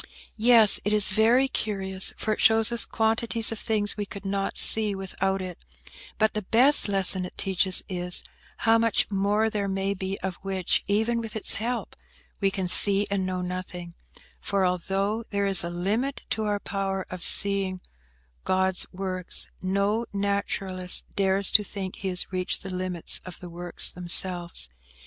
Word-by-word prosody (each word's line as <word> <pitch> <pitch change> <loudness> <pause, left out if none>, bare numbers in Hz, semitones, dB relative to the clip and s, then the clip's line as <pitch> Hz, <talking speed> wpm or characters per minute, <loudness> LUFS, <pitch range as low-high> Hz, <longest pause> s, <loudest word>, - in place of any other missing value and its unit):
"Yes; 225 -2 +5
it 210 - -1
is 210 -2 +3
very 230 +6 +2
curious, 195 -6 -3
for 215 - -2
it - - -5
shows 225 0 +3
us 235 - 0
quantities 225 0 0
of 225 - -5
things 210 -2 -2
we 205 -1 -5
could 200 0 -10
not 195 0 -3
see 215 -2 +5
without 190 0 -3
it; 180 -2 -9 0.6
but 220 0 +1
the 215 - -3
best 245 +9 +5
lesson 190 -1 +2
it 180 - -10
teaches 190 -1 +3
is, 180 -1 -1 0.4
how 225 0 +4
much 230 -1 0
more 205 +3 0
there 210 -2 -3
may 195 0 -2
be 190 0 -5
of 190 -2 -5
which, 190 -2 -1
even 225 +3 0
with 225 -1 -7
its 220 - +2
help, 235 +2 -4 0.4
we 195 - +1
can 190 -1 -4
see 200 +2 +7
and 190 -2 -2
know 185 -1 -4
nothing; 180 -1 -7 0.5
for, 195 -2 -1
although 195 +5 -2
there 200 -1 -2
is 195 -3 +3
a 170 - -4
limit 210 +11 -3
to 220 - -2
our 205 -1 -2
power 195 -1 -4
of 180 -1 -7
seeing 195 -2 +2 0.6
God's 190 0 0
works, 185 -1 +1
no 200 +5 -1
naturalist 195 -2 0
dares 195 0 0
to 210 - +4
think 190 -2 -7
he 195 - -6
has 180 0 -2
reached 185 +1 -2
the 190 -1 -7
limits 180 -2 0
of 185 - -11
the 175 -1 -11
works 175 0 +3
themselves. 175 - -1
195 Hz, 170 wpm, -25 LUFS, 185-215 Hz, 0.6 s, see